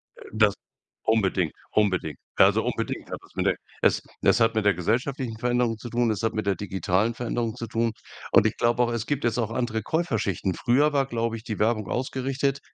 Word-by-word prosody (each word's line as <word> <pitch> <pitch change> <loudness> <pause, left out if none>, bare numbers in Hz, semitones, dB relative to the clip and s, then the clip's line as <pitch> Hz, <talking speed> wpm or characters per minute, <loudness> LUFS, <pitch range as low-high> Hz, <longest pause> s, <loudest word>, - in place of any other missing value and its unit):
Äh, - - -13
das 110 -2 +4 0.5
unbedingt, 95 -7 +1 0.2
unbedingt. 95 -7 +1 0.2
Also, - - +5
unbedingt - - -3
hat - - -3
das - - -21
mit - - -1
der - - +3 0.3
es - - +3 0.2
es - - +4
hat 115 -1 +3
mit 110 -2 +1
der 100 - +5
gesellschaftlichen 115 - -1
Veränderung 120 -1 +1
zu 120 - -8
tun, 120 0 +1
es 105 -1 -2
hat 115 0 +1
mit 110 -1 -2
der 100 -1 +2
digitalen 95 +3 0
Veränderung 115 -1 -2
zu 115 - -5
tun, 115 +1 0 0.4
und - - +6
ich 110 - 0
glaube 120 +1 +2
auch, 120 - 0
es 115 -1 -2
gibt 145 +1 -2
jetzt 120 0 +1
auch 115 -2 -1
andere 115 -2 -1
Käuferschichten. 105 - -1
Früher 140 - +2
war, 140 -1 +2
glaube 115 -3 -2
ich, 110 - -11
die 115 -3 -5
Werbung 110 -2 +1
ausgerichtet 135 +3 -1
115 Hz, 205 wpm, -26 LUFS, 105-120 Hz, 0.5 s, und